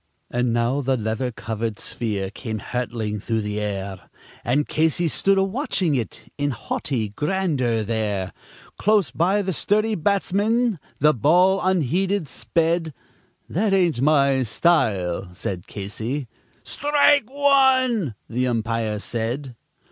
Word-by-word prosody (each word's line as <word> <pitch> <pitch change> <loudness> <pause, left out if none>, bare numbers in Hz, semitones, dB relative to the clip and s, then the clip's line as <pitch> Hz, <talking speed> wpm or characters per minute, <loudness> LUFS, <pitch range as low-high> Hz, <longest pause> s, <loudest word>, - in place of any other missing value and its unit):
And 120 0 +1
now 120 +4 +1
the 135 -1 +1
leather 110 +3 -2
covered 110 0 -4
sphere 100 -5 -3
came 110 -4 -5
hurtling 115 -2 -3
through 110 +2 -1
the 105 0 -3
air, 100 -2 -4 0.3
And 140 +5 +1
Casey 160 +2 +1
stood 195 +5 +2
a 195 - +4
watching 195 - 0
it 120 -5 -3 0.2
in 145 0 +1
haughty 120 -2 -3
grandeur 140 - 0
there; 105 -4 -2 0.5
Close 210 -5 +3
by 190 +5 +1
the 190 -1 -2
sturdy 215 +6 +1
batsman 205 +3 +1 0.2
the 150 +2 +4
ball 180 - +4
unheeded 185 +1 +1
sped: 165 +2 -1 0.5
"That 200 +4 0
ain't 175 -10 +2
my 140 -2 +3
style," 105 - +1
said 90 -1 -5
Casey. 110 +7 -4 0.4
"Strike 290 -3 +3
one," 260 - +3
the 125 +2 -1
umpire 115 -2 -1
said. 120 +5 -3
135 Hz, 125 wpm, -23 LUFS, -, 0.5 s, a